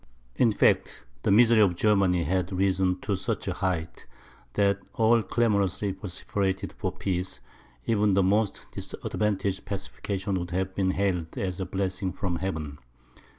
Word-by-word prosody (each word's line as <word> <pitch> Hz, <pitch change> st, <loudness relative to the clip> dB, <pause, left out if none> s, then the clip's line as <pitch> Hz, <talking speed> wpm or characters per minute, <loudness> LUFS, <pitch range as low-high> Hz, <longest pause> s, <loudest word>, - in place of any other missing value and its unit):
In 120 Hz, -3 st, +4 dB
fact, 105 Hz, -, +2 dB, 0.2 s
the -, -, 0 dB
misery 115 Hz, +2 st, +6 dB
of 95 Hz, -5 st, +4 dB
Germany 95 Hz, -3 st, +3 dB
had 90 Hz, +3 st, 0 dB
risen 95 Hz, -1 st, +1 dB
to 100 Hz, -, -1 dB
such 100 Hz, +3 st, -3 dB
a 95 Hz, -, 0 dB
height, 90 Hz, -3 st, -3 dB, 0.5 s
that 100 Hz, -1 st, +2 dB, 0.2 s
all 115 Hz, +1 st, +4 dB
clamorously 100 Hz, -3 st, +1 dB
vociferated 95 Hz, 0 st, -3 dB
for -, -, -3 dB
peace; 90 Hz, -1 st, -3 dB, 0.5 s
and -, -, 0 dB
even 105 Hz, -1 st, +3 dB
the 100 Hz, -, +4 dB
most 100 Hz, +2 st, +1 dB
disadvantageous 100 Hz, -2 st, -2 dB
pacification 100 Hz, -1 st, -3 dB
would 90 Hz, 0 st, -5 dB
have 95 Hz, +1 st, -2 dB
been 95 Hz, -1 st, +1 dB
hailed 95 Hz, -4 st, -1 dB
as 90 Hz, -1 st, -2 dB
a 95 Hz, -, -3 dB
blessing 95 Hz, -1 st, -2 dB
from 90 Hz, -2 st, -2 dB
heaven. 80 Hz, -7 st, -4 dB
95 Hz, 150 wpm, -27 LUFS, 90-100 Hz, 0.5 s, misery